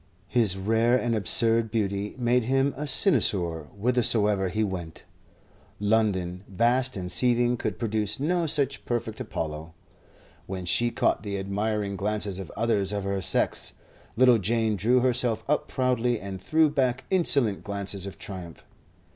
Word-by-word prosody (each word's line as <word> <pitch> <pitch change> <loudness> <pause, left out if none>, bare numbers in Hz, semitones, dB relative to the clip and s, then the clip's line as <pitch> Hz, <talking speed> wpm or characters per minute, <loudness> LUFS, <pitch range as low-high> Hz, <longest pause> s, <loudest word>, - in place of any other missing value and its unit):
His 110 -7 +2
rare 115 +5 +2
and 120 -2 -1
absurd 115 +1 +3
beauty 100 -2 -2
made 125 -1 +1
him 135 +2 +1
a 150 +2 -5
cynosure 90 - +2
whithersoever 105 -3 +2
he 110 +4 -1
went. 90 -5 -6 0.8
London, 100 -4 0
vast 120 +5 0
and 90 -1 -5
seething, 120 +4 +2
could 110 -5 -4
produce 105 -1 -2
no 170 +3 0
such 140 -3 +1
perfect 115 -2 -3
Apollo. 80 +1 -6 0.7
When 95 -1 -5
she 120 +7 +2
caught - - 0
the 100 -2 -4
admiring 100 +1 -2
glances 100 -1 -3
of 95 - -7
others 105 -4 0
of 100 -1 -3
her 100 0 -2
sex, - - +1 0.4
little 125 -2 +5
Jane 110 +2 0
drew 120 +6 +2
herself 125 -2 +1
up 150 +1 0
proudly 125 -3 0
and 95 -1 -7
threw 160 +6 +3
back 130 -3 -1
insolent 140 - +2
glances 100 -1 -2
of 100 - -9
triumph. 90 -4 -8
110 Hz, 145 wpm, -26 LUFS, 100-125 Hz, 0.8 s, little